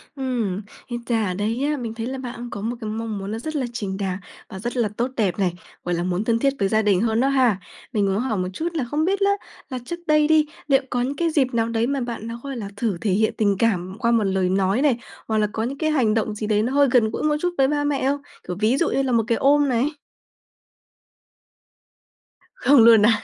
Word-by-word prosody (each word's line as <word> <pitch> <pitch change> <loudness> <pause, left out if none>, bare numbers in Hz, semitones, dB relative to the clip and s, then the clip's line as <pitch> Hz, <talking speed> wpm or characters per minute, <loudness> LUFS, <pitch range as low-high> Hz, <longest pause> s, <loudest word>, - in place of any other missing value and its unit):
Ừm, 240 -8 -2 0.3
ít 240 -1 -4
ra 225 -3 +1
ở 180 - -1
đây 220 +7 -1
á, 295 - -1
mình 230 -3 -4
thấy 225 0 -5
là 265 +1 -4
bạn 245 -2 -6
cũng 240 0 -6
có 205 - -6
một 230 +3 -2
cái 215 - -4
mong 220 -1 -3
muốn 195 +1 -5
nó 225 - -3
rất 310 +5 -5
là 270 - 0
chính 195 -4 -3
đáng 190 -2 -2 0.3
và 190 - -7
rất 240 +4 -4
là 225 -4 +2
tốt 245 +2 0
đẹp 200 -3 0
này, 180 -3 +1 0.3
gọi 175 0 -1
là, 170 - -1
muốn 180 +3 -1
thân 230 0 +1
thiết 275 +2 +2
với 195 - +2
gia 215 +2 +2
đình 200 -2 +2
hơn 225 0 +1
đó 270 - +3
ha. 250 -8 +3 0.3
Mình 205 -2 +2
muốn 195 +2 +1
hỏi 240 -5 -1
một 185 - -1
chút 325 - -2
là 305 -6 -1
không 300 +6 -1
biết 390 +2 +1
á, 400 0 +3 0.4
là 255 - -4
trước 345 +4 -5
đây 305 -1 +4
đi, 310 -1 +4 0.2
liệu 275 -1 +4
có 245 - 0
những 270 +3 -1
cái 335 +2 +1
dịp 265 -5 +1
nào 230 0 +1
đấy 230 0 0
mà 280 0 -1
bạn 235 -2 -5
nó, 230 +1 -6
gọi 275 -2 -5
là, 205 -3 -5
thử 205 -4 -1
thể 205 - 0
hiện 215 +3 +2
tình 205 -2 +2
cảm 190 -3 0
qua 235 -1 +2
một 230 -2 +3
lời 190 -2 +1
nói 195 +5 +1
này, 280 -5 +3 0.3
hoặc 220 - 0
là 210 -1 +2
có 220 +1 -2
những 270 +4 -3
cái 315 -1 0
hành 240 -8 +2
động 215 -1 -1
gì 215 0 -4
đấy 210 0 +2
nó 250 - -1
hơi 285 0 +5
gần 235 -4 +4
gũi - - -3
một 305 -1 +2
chút 355 0 0
với 265 -1 +4
ba 290 0 0
mẹ 285 -2 0
không? 285 0 -1 0.3
Kiểu, 180 - -3
ví 225 +5 +2
dụ 335 - +2
như 275 - +1
là 265 -2 -1
một 230 -1 +3
cái 230 - +2
ôm 285 0 +4
này? 255 +5 +1 2.6
Không 285 - +5
luôn 225 -2 +8
à? 220 -2 +3
230 Hz, 270 wpm, -23 LUFS, 210-270 Hz, 2.6 s, luôn